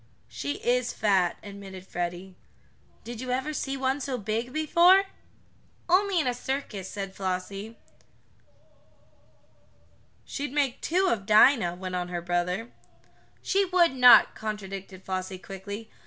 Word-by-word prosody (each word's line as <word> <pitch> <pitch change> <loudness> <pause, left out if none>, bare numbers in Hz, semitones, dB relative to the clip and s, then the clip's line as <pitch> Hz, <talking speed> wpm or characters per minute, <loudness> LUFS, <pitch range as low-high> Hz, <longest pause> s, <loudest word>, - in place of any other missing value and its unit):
"She 125 +5 -4
is 245 0 +1
fat," 190 -5 +1
admitted 195 -2 -10
Freddie. 175 +1 -5 0.7
"Did 235 0 -7
you 255 - -6
ever 260 +5 -1
see 275 -2 -3
one 265 +1 -1
so 260 -1 -3
big 220 +3 -3
before?" 340 +6 +5 0.8
"Only 375 +1 +3
in 310 - 0
a 250 - +1
circus," 245 -7 -4
said 195 -2 -6
Flossie. 195 +3 -4 2.5
"She'd 285 -2 -5
make 285 -3 +2
make - - -26
two 370 +3 +1
of 205 - -1
Dinah," 215 -4 +5
went 185 0 -6
on 180 -1 -2
her 175 -1 -4
brother. 180 +6 -2 0.7
"She 395 +1 +2
would 355 -4 +3
not," 250 -1 +7
contradicted 195 -3 -7
Flossie 185 0 -4
quickly. 200 +3 -8
215 Hz, 130 wpm, -27 LUFS, 190-265 Hz, 2.5 s, not